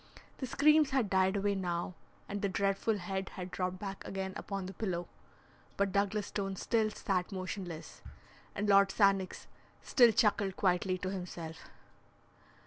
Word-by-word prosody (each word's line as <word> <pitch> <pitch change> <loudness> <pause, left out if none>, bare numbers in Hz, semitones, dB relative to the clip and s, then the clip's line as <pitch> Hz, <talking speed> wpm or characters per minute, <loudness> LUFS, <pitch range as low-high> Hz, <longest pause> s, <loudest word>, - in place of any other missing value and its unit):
The 260 - -3
screams 300 +2 +5
had 265 -7 +1
died 190 +1 +3
away 200 0 +1
now, 180 -2 -2 0.3
and 205 0 -4
the 200 - +1
dreadful 195 +3 +1
head 190 +1 -3
had 180 -1 -5
dropped 185 0 -2
back 195 0 -6
again 190 -1 -4
upon 195 -2 -4
the 190 - -6
pillow, 175 -3 -3 0.7
but 200 -1 +1
Douglas 200 +1 +1
Stone 195 -2 -3
still 220 +2 +1
sat 190 -3 -2
motionless, 185 -3 -6 0.5
and 205 +1 -1
Lord 200 -1 +6
Sannox 195 -2 +2 0.4
still 240 -3 +6
chuckled 205 -3 +2
quietly 185 0 +2
to 185 +1 -3
himself. 170 -4 -7
195 Hz, 145 wpm, -33 LUFS, 185-205 Hz, 0.7 s, Lord